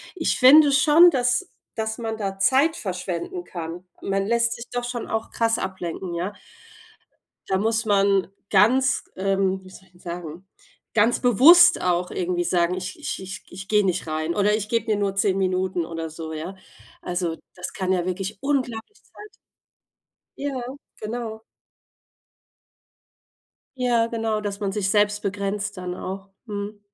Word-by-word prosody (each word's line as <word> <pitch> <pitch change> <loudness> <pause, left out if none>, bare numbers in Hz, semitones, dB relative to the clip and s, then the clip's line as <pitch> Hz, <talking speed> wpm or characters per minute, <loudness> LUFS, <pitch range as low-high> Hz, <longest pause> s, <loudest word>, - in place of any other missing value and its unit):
Ich 330 - 0
finde 285 +3 +8
schon, 310 +5 +7
dass 255 +7 +1 0.3
dass 220 0 -2
man 225 -2 -3
da 195 -3 -4
Zeit 275 +10 +3
verschwenden 190 - -4
kann. 175 - -7 0.2
Man 195 0 -1
lässt 235 +1 +2
sich 235 - -9
doch 245 0 -2
schon 240 -1 -4
auch 220 0 -2
krass 225 -1 +1
ablenken, 185 -1 -5
ja. 175 +4 -2 1.2
Da 190 - +1
muss 225 +2 +1
man 195 -3 +3 0.2
ganz, 255 +7 +4
ähm, 190 0 0
wie 185 - -13
soll 190 - -14
ich 175 - -29
denn 175 - -22
sagen, 175 0 -7 0.5
ganz 225 +2 +3
bewusst 330 - +7
auch 180 0 0
irgendwie 175 -1 -1
sagen: 175 0 +1
„Ich 185 +2 -6
ich - - -4
ich 190 0 -7
ich 190 +1 -9
gehe 210 -1 +3
nicht 180 -3 -1
rein, 155 +1 -2
oder 210 +1 +3
ich 210 -1 -4
gebe 230 -1 0
mir 215 -2 +1
nur 200 -1 0
10 195 -1 +1
Minuten 185 -2 0
oder 165 -1 -5
so.”, 160 0 -7
ja. 160 +5 -6 0.5
Also, 175 -2 -2 0.2
das 180 0 -6
kann 190 -2 -1
ja 180 -2 0
wirklich 190 +2 -4
unglaublich 270 - -2
Zeit 420 0 -15 1.0
Ja, 275 -2 -3 0.4
genau. 220 0 -5 2.3
Ja, 240 -3 +2
genau, 225 -2 -2
dass 205 -1 -5
man 200 -1 -1
sich 205 -2 -1
selbst 210 0 +2
begrenzt 200 +1 -3
dann 180 -1 -4
auch, 195 +1 -6 0.2
mhm. 205 0 -5
200 Hz, 155 wpm, -24 LUFS, 185-230 Hz, 2.3 s, finde